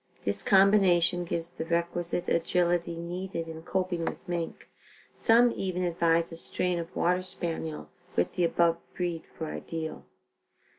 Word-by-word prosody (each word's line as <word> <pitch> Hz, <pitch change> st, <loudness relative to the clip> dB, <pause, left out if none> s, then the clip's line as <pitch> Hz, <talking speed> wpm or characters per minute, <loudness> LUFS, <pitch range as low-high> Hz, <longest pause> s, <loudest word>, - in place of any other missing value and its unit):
This 100 Hz, 0 st, 0 dB
combination 185 Hz, -, +4 dB
gives 170 Hz, 0 st, -3 dB
the 160 Hz, -, -5 dB
requisite 170 Hz, +1 st, -1 dB
agility 170 Hz, 0 st, +1 dB
needed 170 Hz, 0 st, -4 dB
in 160 Hz, 0 st, -7 dB
coping 180 Hz, 0 st, -1 dB
with 180 Hz, -, -4 dB
mink. 170 Hz, -2 st, -4 dB, 0.5 s
Some 235 Hz, +2 st, +5 dB
even 185 Hz, -1 st, -2 dB
advise 170 Hz, -1 st, +2 dB
a 165 Hz, -, -7 dB
strain 180 Hz, +1 st, -1 dB
of 170 Hz, +1 st, -7 dB
water 180 Hz, +1 st, +2 dB
Spaniel 165 Hz, -4 st, -4 dB, 0.3 s
with -, -, +1 dB
the 180 Hz, -, 0 dB
above 170 Hz, 0 st, +3 dB, 0.2 s
breed 175 Hz, -2 st, -2 dB
for 160 Hz, -, -3 dB
ideal. 160 Hz, 0 st, -5 dB
170 Hz, 140 wpm, -29 LUFS, 165-180 Hz, 0.5 s, Some